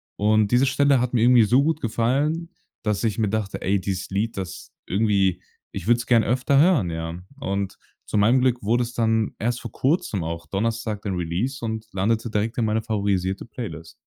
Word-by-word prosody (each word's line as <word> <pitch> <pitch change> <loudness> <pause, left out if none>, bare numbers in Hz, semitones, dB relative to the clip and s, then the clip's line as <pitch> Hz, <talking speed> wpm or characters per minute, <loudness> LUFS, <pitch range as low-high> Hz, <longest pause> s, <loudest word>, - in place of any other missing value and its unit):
Und 105 0 +2
diese 125 +3 +4
Stelle 135 -1 +3
hat 125 0 -2
mir 115 - +2
irgendwie 120 -2 +6
so 125 +6 +4
gut 160 0 0
gefallen, 140 +9 0 0.3
dass 105 0 -1
ich 110 -1 0
mir 110 -3 +1
dachte: 110 -2 -3
„Ey, 95 0 +1
dieses 95 0 -3
Lied, 105 +3 -2
das 90 -1 -6 0.2
irgendwie 100 -2 +1 0.3
ich - - -6
würd's 120 0 +3
gern 115 -3 +4
öfter 130 +4 +2
hören“, 155 - +4
ja? 80 +1 -4 0.2
Und 100 -7 -3 0.3
zu - - -2
meinem 120 +5 +4
Glück 125 -1 +1
wurde 120 +4 +2
es 120 0 -6
dann 110 -2 +1
erst 120 +2 -1
vor 120 - -7
Kurzem, 130 - 0
auch 85 0 -5
Donnerstag 110 0 -2
den 95 -3 -2
Release 95 +10 -2
und 110 0 -4
landete 110 +4 0
direkt 110 +2 -1
in 115 - +1
meine 110 +1 +1
favorisierte 100 -3 -1
Playlist. 90 -9 -7
110 Hz, 190 wpm, -23 LUFS, 100-120 Hz, 0.3 s, irgendwie